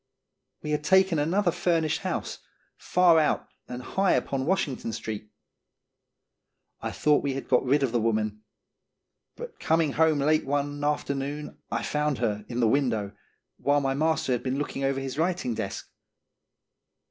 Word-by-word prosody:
We 150 - -3
had 150 0 0
taken 190 -1 +4
another 175 +5 +2
furnished 165 -2 +1
house, 185 -1 -3 0.4
far 175 -3 +4
out 155 - +1 0.2
and 125 0 -6
high 195 +7 +1
upon 135 -1 -1
Washington 140 -10 -1
street. 110 -1 -5 1.5
I - - -2
thought 150 -1 +2
we 140 -2 -2
had 135 - -5
got 125 - +3
rid 140 +2 +2
of 130 - +1
the 120 - +1
woman; 110 -1 0 0.9
but 480 -1 -9
coming 160 -2 +2
home 160 +1 +3
late 155 +2 +2
one 145 +1 -1
after 145 -1 0
noon 145 +2 -5
I - - -2
found 150 -2 0
her 105 -3 -1
in 120 0 -2
the 115 - +4
window, 110 -6 0 0.4
while 145 +1 +2
my 135 -1 0
master 155 -1 0
had 125 - +1
been 130 +1 -2
looking 140 -1 -3
over 135 0 +1
his 135 +1 -5
writing 170 -7 0
desk. - - -5
145 Hz, 160 wpm, -27 LUFS, 125-160 Hz, 1.5 s, taken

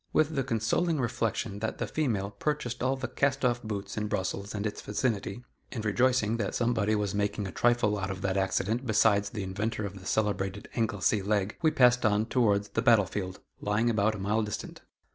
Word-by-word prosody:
With 155 0 +3
the 135 -3 0
consoling 135 +8 0
reflection 115 -3 -1
that 110 +1 -3
the - - -2
female 110 -10 -1
purchased 125 -3 -3
all 130 +2 +1
the 130 -1 -4
cast 135 +1 0
off 120 -1 +1
boots 100 -3 -5
in 105 0 -1
Brussels 100 +1 -3
and 105 0 -3
its 105 - -3
vicinity, 105 0 -2 0.3
and 110 -4 -4
rejoicing 115 0 +2
that 105 -4 -2
somebody 115 -3 +1
was 105 -2 -1
making 100 0 -1
a 95 - -5
trifle 120 -4 +2
out 95 0 -3
of 95 -1 -5
that 95 -1 0
accident 105 +5 0
besides 105 -2 +3
the 105 -1 -4
inventor 105 +3 -2
of 100 0 -7
the 95 - -10
celebrated 100 -2 -1
"Anglesey 105 -2 +1
leg," 100 0 0
we 160 - +5
passed 125 -5 +4
on 105 -1 +3
towards 105 -4 +2
the 115 - -1
battle 115 -5 +5
field, 95 +1 -5 0.2
lying 110 +3 +1
about 110 0 +2
a - - -5
mile 105 +3 0
distant. 105 -1 -5
105 Hz, 200 wpm, -29 LUFS, 100-120 Hz, 0.3 s, we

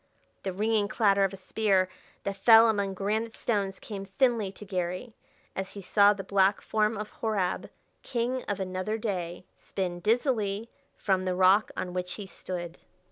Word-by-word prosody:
The 190 - -3
ringing 210 +2 +1
clatter 200 -2 +3
of 195 - +2
a - - -7
spear 190 -1 +1 0.4
that 200 - -2
fell 225 +2 +7
among 200 -3 0
granite 215 +4 -1
stones 200 -4 -1
came 200 -3 -6
thinly 210 +1 +1
to 210 - -11
Garry 185 +4 -3 0.4
as 190 0 -4
he 200 - -7
saw 200 +2 +5
the 200 -1 -3
black 195 +1 +3
form 215 0 0
of 210 0 -5
Horab, 205 -5 -1 0.3
king 250 +1 -1
of 205 -1 -2
another 185 +3 -2
day, 180 -6 -4
spin 180 -3 -3
dizzily 220 -1 0 0.3
from 190 -2 +1
the 185 -1 -1
rock 190 +3 +5
on 180 - -3
which 180 0 -2
he 205 - -7
stood. 175 -2 -6
200 Hz, 165 wpm, -28 LUFS, 185-220 Hz, 0.4 s, fell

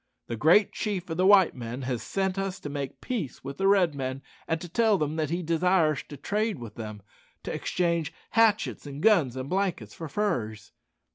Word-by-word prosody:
The 115 - -4
Great 160 - +5
Chief 200 -4 -3
of 160 - -3
the 185 +1 +3
white 195 -3 +6
men 120 +1 -6
has 125 -2 -2
sent 190 -1 -1
us 195 -1 -3
to 145 - -5
make 140 -1 -5
peace 195 - -4
with 140 +1 -7
the 195 - +3
Red 190 -5 +4
men, 135 -1 -4 0.2
and 165 - 0
to 175 - -7
tell 220 +4 +3
them 150 -2 -1
that 155 -2 0
he 175 +2 -2
desires 165 -2 +2
to 145 - -8
trade 210 - -1
with 115 -3 -8
them 105 -3 -7 0.4
to - - -4
exchange 170 -3 0 0.2
hatchets, 220 -8 +2
and 145 +1 -7
guns, 175 - +4
and 130 0 -4
blankets 180 - -1
for 165 - -7
furs." 120 - -2
160 Hz, 200 wpm, -27 LUFS, 135-195 Hz, 0.4 s, white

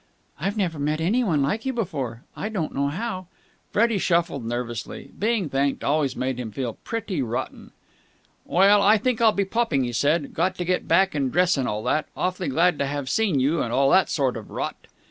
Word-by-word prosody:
"I've 195 +7 -2
never 175 -7 -1
met 150 +2 0
anyone 175 - +1
like 205 +11 -1
you 265 - -1
before. 135 - -3
I 210 - -4
don't 185 -8 -3
know 140 +1 0
how...." 185 +3 -4 0.4
Freddie 225 -1 +2
shuffled 170 -7 +1
nervously. 120 0 -5
Being 215 -4 +1
thanked 140 0 0
always 145 -2 +1
made 130 -1 -2
him 120 -3 -4
feel 120 +1 -4
pretty 220 - -3
rotten. 125 +1 -4 0.7
"Well, 200 +3 +4
I 210 +2 +5
think 235 +2 -1
I'll 225 -1 +6
be 200 -1 0
popping," 195 - 0
he 120 -1 -3
said. 145 +5 +1
"Got 185 +3 0
to 180 - -3
get 180 +1 -1
back 190 0 +3
and 135 -4 -1
dress 180 +1 +3
and 135 -3 -1
all 105 +1 -2
that. 155 - 0
Awfully 185 0 -1
glad 165 +3 +2
to 140 - 0
have 140 -2 -3
seen 205 -11 +2
you, 145 +5 +1
and 115 - -2
all 135 +2 +3
that 190 -1 +4
sort 130 -5 0
of 110 - -9
rot." - - -5
160 Hz, 205 wpm, -24 LUFS, 135-195 Hz, 0.7 s, I'll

